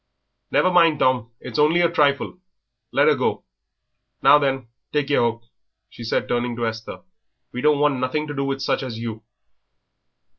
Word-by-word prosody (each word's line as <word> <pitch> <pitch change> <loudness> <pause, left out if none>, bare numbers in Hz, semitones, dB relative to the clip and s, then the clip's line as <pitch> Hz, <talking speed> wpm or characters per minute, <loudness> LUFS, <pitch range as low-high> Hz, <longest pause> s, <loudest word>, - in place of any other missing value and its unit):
"Never 185 - +2
mind, 165 -3 +4
Tom; 125 -4 +1
it - - -9
is - - -3
only 155 +4 +4
a 170 - +4
trifle. 145 +2 +1 0.5
Let - - +3
her - - +6
go. - - -1 0.8
Now 150 - +7
then, 135 -3 -1 0.2
take 145 -1 -1
yer - - +3
hook," 115 0 -1 0.5
she 120 - -10
said, 115 - -1
turning 120 0 -1
to 120 0 -2
Esther; 110 0 -6 0.5
"we 125 - -5
don't 150 0 +3
want 145 -2 +1
nothing 130 +4 -1
to 150 - -6
do 140 -1 -2
with 135 0 -3
such - - 0
as 125 -4 -6
you." 115 -1 -6
135 Hz, 180 wpm, -22 LUFS, 120-150 Hz, 0.8 s, Now